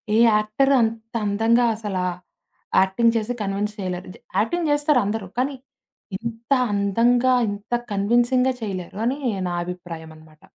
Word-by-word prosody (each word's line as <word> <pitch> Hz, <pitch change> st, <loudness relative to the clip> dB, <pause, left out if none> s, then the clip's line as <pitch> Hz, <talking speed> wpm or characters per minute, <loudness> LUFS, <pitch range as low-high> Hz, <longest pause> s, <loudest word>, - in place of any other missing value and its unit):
ఏ -, -, +4 dB, 0.2 s
actor 215 Hz, +6 st, +2 dB
అంత 225 Hz, 0 st, -2 dB
అందంగా 225 Hz, +4 st, +3 dB
అసలా. 200 Hz, -4 st, -3 dB, 0.8 s
యాక్టింగ్ 230 Hz, +5 st, +2 dB
చేసి 225 Hz, +2 st, -2 dB
కన్విెన్స్ 205 Hz, +1 st, -2 dB
చేయలేరు. 180 Hz, -1 st, -4 dB
జ -, -, -13 dB, 0.2 s
యాక్టింగ్ 330 Hz, +8 st, 0 dB
చేస్తారందరూ. 240 Hz, -9 st, +1 dB
కానీ. 275 Hz, +2 st, 0 dB, 0.6 s
ఇంత 230 Hz, +3 st, -8 dB, 0.2 s
అందంగా 230 Hz, +6 st, +3 dB, 0.2 s
ఇంత 205 Hz, +2 st, -8 dB, 0.2 s
కన్విన్సింగ్‌గా 240 Hz, +5 st, +2 dB
చేయలేరు 195 Hz, -1 st, -5 dB
అని 260 Hz, +4 st, 0 dB, 0.3 s
నా 175 Hz, -, -2 dB
అభిప్రాయం 170 Hz, -3 st, -7 dB
అనమాట. 155 Hz, -1 st, -19 dB
215 Hz, 125 wpm, -23 LUFS, 195-240 Hz, 0.8 s, ఏ